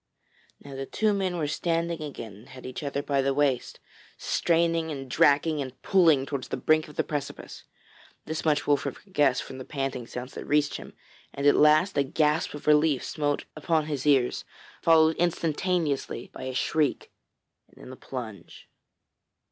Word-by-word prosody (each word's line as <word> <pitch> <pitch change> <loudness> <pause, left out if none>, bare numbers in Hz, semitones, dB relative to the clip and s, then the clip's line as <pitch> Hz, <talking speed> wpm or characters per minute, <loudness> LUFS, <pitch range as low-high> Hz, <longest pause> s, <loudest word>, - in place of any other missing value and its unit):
Now 140 - -11
the 135 0 -5
two 215 -1 +1
men 190 -3 -1
were 160 - -1
standing 165 +2 -1
again 120 -8 -7
and 105 +4 -16
had 130 0 -11
each 130 +3 -6
other 140 -1 -3
by 140 -1 +1
the 135 0 0
waist, 140 -3 0 0.4
straining 165 -1 +1
and 135 -3 -5
dragging 145 +4 +3
and 130 -1 -7
pulling 165 -8 +4
towards 140 -2 -4
the - - -3
brink 155 0 +2
of 150 - -13
the - - +1
precipice. 145 -2 -6 0.6
This 160 0 -4
much 150 -2 +1
Wolfert 145 -1 +1
could 195 - -20
guess 140 -5 +3
from 130 - -7
the - - -6
panting 135 -4 -4
sounds 125 +1 -7
that - - -7
reached 150 -1 +1
him, - - -11 0.4
and 140 - -3
at 145 - +7
last 155 +6 +4
a - - +4
gasp 150 +2 0
of 145 - -10
relief 150 -2 +3
smote 145 -2 -2
upon 155 0 0
his 150 -2 -3
ears 135 -4 +3 0.4
followed 160 -1 +5
instantaneously 165 -5 -1
by - - -7
a 130 -1 -4
shriek 150 +1 0 0.6
and - - -25
then - - -11
a - - -9
plunge. 110 -9 -8
145 Hz, 175 wpm, -27 LUFS, 135-160 Hz, 0.6 s, at